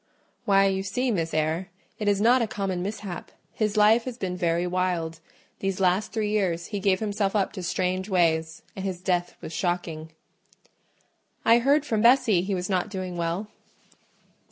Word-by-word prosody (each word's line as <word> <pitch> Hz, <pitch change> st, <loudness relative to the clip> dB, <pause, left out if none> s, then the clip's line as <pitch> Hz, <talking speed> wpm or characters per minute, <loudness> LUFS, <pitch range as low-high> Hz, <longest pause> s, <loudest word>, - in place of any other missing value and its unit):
"Why, 195 Hz, -2 st, +5 dB
you 190 Hz, -1 st, +1 dB
see, 245 Hz, +6 st, -1 dB
Miss 165 Hz, -5 st, -1 dB
Eyre, 160 Hz, +4 st, -1 dB, 0.3 s
it 210 Hz, -, -2 dB
is 200 Hz, -1 st, +3 dB
not 240 Hz, +4 st, +4 dB
a 230 Hz, -, +1 dB
common 195 Hz, -4 st, -3 dB
mishap: 195 Hz, -2 st, -5 dB, 0.2 s
his 215 Hz, -1 st, -1 dB
life 220 Hz, +2 st, +5 dB
has 250 Hz, -2 st, -5 dB
been 185 Hz, -5 st, -3 dB
very 170 Hz, -1 st, 0 dB
wild: 175 Hz, -3 st, -1 dB, 0.4 s
these 195 Hz, -1 st, -2 dB
last 190 Hz, +3 st, +2 dB
three 215 Hz, -2 st, -1 dB
years 180 Hz, -5 st, 0 dB
he 205 Hz, +2 st, -4 dB
gave 190 Hz, -1 st, +2 dB
himself 205 Hz, -1 st, -1 dB
up 195 Hz, -2 st, +1 dB
to 190 Hz, -, -6 dB
strange 185 Hz, +2 st, -1 dB
ways, 160 Hz, -3 st, +1 dB
and 190 Hz, -, -5 dB
his 190 Hz, -2 st, -3 dB
death 175 Hz, -1 st, -1 dB
was 160 Hz, -, -7 dB
shocking." 170 Hz, -3 st, -2 dB, 1.4 s
"I 230 Hz, +1 st, +6 dB
heard 280 Hz, +4 st, +3 dB
from 220 Hz, -6 st, 0 dB
Bessie 235 Hz, -6 st, +5 dB
he 195 Hz, +2 st, -2 dB
was 180 Hz, 0 st, -3 dB
not 185 Hz, +1 st, 0 dB
doing 185 Hz, -3 st, -5 dB
well." 170 Hz, +4 st, -2 dB
190 Hz, 175 wpm, -26 LUFS, 175-210 Hz, 1.4 s, I